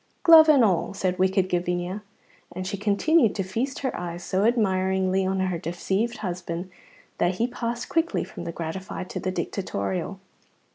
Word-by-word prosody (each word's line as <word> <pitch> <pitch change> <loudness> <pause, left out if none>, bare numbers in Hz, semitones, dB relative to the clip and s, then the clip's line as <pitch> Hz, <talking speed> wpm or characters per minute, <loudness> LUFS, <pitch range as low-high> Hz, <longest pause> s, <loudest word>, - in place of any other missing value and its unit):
"Glove 325 -3 +9
and 275 -6 +6
all," 190 0 0
said 185 -1 -1
wicked 190 0 +2
Gavinia, 180 +2 -2 0.5
and 185 +1 -5
she 195 +2 -3
continued 215 - +2
to 195 - -1
feast 235 +9 -3
her 265 - -2
eyes 175 0 -5
so 190 +3 0
admiringly 190 -4 +1
on 190 0 0
her 185 -3 -1
deceived 195 +8 -2
husband 175 0 -4 0.5
that 175 +1 +2
he 225 - +1
passed 240 -1 -4
quickly 330 0 0
from 170 - -9
the 170 - -3
gratified 180 +3 -6
to - - -4
the 185 - -2
dictatorial. 165 - -3
190 Hz, 160 wpm, -25 LUFS, 180-225 Hz, 0.5 s, Glove